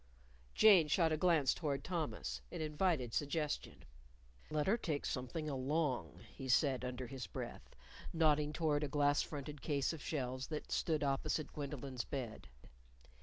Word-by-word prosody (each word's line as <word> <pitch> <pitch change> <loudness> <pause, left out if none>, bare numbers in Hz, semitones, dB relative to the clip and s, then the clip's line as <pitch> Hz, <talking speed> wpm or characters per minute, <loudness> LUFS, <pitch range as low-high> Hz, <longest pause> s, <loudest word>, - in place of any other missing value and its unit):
Jane 195 -8 +7
shot 160 +2 +3
a - - +3
glance 155 -5 +4
toward 140 -4 -2
Thomas. 115 - -3
It - - -6
invited 155 -5 0
suggestion. 150 +1 -2 0.6
"Let 150 -1 0
her 205 - +4
take 155 -10 -2
something 135 +5 -3
along," 140 0 -1
he 135 -1 -7
said 130 0 +3
under 125 0 -3
his 125 -3 -6
breath, - - -7 0.4
nodding 150 -2 +3
toward 150 -1 +1
a - - 0
glass 145 0 +3
fronted 145 -1 -6
case 140 0 0
of 160 - -7
shelves 130 -3 -3
that 155 -1 -5
stood 155 -3 +1
opposite 140 +2 -1
Gwendolyn's 140 -4 -4
bed. 120 - -5
145 Hz, 145 wpm, -37 LUFS, 130-155 Hz, 0.6 s, Jane